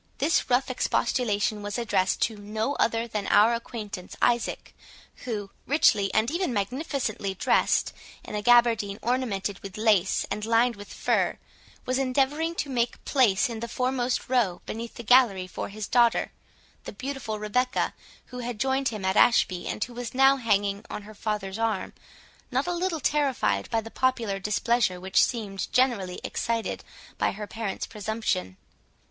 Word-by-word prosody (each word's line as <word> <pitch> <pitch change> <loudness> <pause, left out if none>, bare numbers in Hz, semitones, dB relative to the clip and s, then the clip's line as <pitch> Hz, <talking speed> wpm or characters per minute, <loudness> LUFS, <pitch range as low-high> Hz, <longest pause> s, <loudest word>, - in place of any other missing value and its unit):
This 305 +1 +1
rough 255 +1 +2
expostulation 215 -4 0
was 205 +2 -4
addressed 205 -5 +1
to 220 - 0
no 215 +5 -3
other 230 0 +1
than 210 -3 -3
our 220 +3 +5
acquaintance 215 -5 -6
Isaac, 240 -1 0 0.5
who, 210 -5 -4 0.2
richly 210 -9 +3
and 220 +4 +1
even 345 -2 -1
magnificently 225 -2 -2
dressed - - +2 0.3
in - - -9
a 210 - -1
gaberdine 230 -3 +4
ornamented 220 -5 -1
with 195 -3 -9
lace 210 -4 +2
and 210 - -3
lined 230 +2 +3
with 205 0 -11
fur, - - 0 0.5
was 255 +1 0
endeavouring 275 +5 +1
to 295 - -2
make 240 -1 -1
place 250 -3 +3
in 230 -2 -5
the 235 - -4
foremost 250 +1 -1
row 235 -9 +1
beneath 230 +1 -6
the 235 - -7
gallery 230 -6 +5
for 185 - -6
his 210 0 -6
daughter, 240 -1 +3 0.5
the - - -7
beautiful 255 -1 -4
Rebecca, 250 +5 0 0.4
who 250 - -5
had 240 -3 -5
joined 265 +1 +1
him 215 -5 -3
at 190 +1 +1
Ashby, 185 -7 +3
and - - -2
who 245 - -7
was 245 0 -6
now 270 +1 +6
hanging 205 -4 0
on 210 - -6
her 215 +1 -11
father's 210 -1 -3
arm, 225 -4 -1 0.6
not 260 +2 0
a 355 - -1
little 345 -2 -1
terrified 265 - +1
by 225 - +1
the 225 +1 -10
popular 235 -6 0
displeasure 210 -1 +1
which 190 +1 +3
seemed 205 -5 -3
generally 230 -8 +1
excited 230 -1 -2 0.4
by - - +1
her 210 +2 -6
parent's 220 -1 -4
presumption. 210 - -3
230 Hz, 160 wpm, -26 LUFS, 205-250 Hz, 0.6 s, now